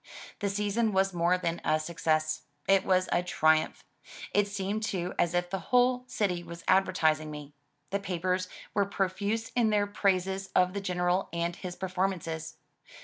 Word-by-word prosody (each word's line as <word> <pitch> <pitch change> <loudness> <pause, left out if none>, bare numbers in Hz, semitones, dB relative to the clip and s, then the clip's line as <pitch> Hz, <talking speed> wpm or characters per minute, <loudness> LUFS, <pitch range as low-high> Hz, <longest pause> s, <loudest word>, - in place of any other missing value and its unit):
The 200 - 0
season 210 +2 0
was 190 0 +2
more 175 +1 +2
than 170 -2 -2
a 155 - +2
success; 155 -1 0 0.3
it 195 -1 +5
was 185 -1 +2
a 175 - +3
triumph. 160 -3 +2 0.5
It 205 0 +3
seemed 200 +1 -2
too 185 -4 -2
as 175 0 +2
if 175 0 0
the 195 - -1
whole 250 0 +3
city 185 -7 -1
was 170 0 -10
advertising 160 -5 +3
me. 150 -1 -8 0.4
The 200 - 0
papers 185 -1 -1 0.3
were 200 -1 +2
profuse 200 +3 -1
in 235 -3 +2
their 205 -1 +2
praises 195 -1 0
of 180 0 +4
the 200 - -3
General 180 0 0
and 170 +1 -1
his 180 0 -6
performances. 180 -4 -2
185 Hz, 160 wpm, -29 LUFS, 170-200 Hz, 0.5 s, it